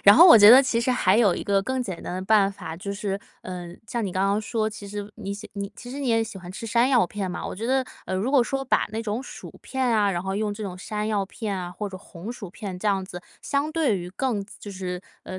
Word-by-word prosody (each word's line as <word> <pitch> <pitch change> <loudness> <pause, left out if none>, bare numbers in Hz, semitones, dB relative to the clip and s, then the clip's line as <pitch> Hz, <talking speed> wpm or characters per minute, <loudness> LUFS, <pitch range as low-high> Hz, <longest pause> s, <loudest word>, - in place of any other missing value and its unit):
然 200 - +9
后 345 - +10
我 335 - +10
觉 205 0 +10
得 255 +3 +10
其 235 -3 +1
实 255 - +1
还 210 -5 +3
有 205 -7 +4
一 - - -5
个 200 -1 +2
更 260 +3 -2
简 190 -7 -6
单 - - -5
的 185 - -3
办 200 -1 +4
法， 160 -4 -7
就 200 +3 -5
是 200 -1 -3 0.2
呃， 180 -2 -6 0.2
像 235 -2 -2
你 190 - -2
刚 190 +2 +1
刚 200 +2 +1
说， 220 0 -1
其 205 -1 -9
实 205 0 -6
你 200 -2 -5
喜 205 +1 -8
你 200 -1 -5
其 245 - -9
实 280 - -5
你 270 - -1
也 225 -1 +3
喜 220 -3 -8
欢 175 -1 -9
吃 220 +4 -7
山 235 +3 +3
药 245 -9 +4
片 195 -2 -4
嘛， - - -5
我 - - -5
觉 220 +5 -6
得， 265 0 +2 0.2
呃， 185 - -2
如 220 +8 -1
果 275 -4 +5
说 270 +2 -2
把 - - +2
那 220 - -3
种 225 +3 -3
薯 - - -9
片 265 -1 -2
啊， 215 -4 +3
然 175 -2 -1
后 190 0 -3
用 210 0 -1
这 215 +1 -7
种 180 -2 -5
山 210 +3 -4
药 205 -3 0
片 205 0 -4
啊 175 -1 -4
或 205 +3 -5
者 190 - -8
红 185 +4 -8
薯 200 -7 -9
片 195 -1 -6
这 210 - 0
样 195 -2 +1
子， 180 -1 -9 0.2
相 285 +2 -1
对 305 -10 +1
于 180 0 -6
更 210 -1 -1
就 205 - -8
是 180 -1 -4 0.2
呃， 185 - -7
205 Hz, 305 characters per minute, -25 LUFS, 190-235 Hz, 0.2 s, 后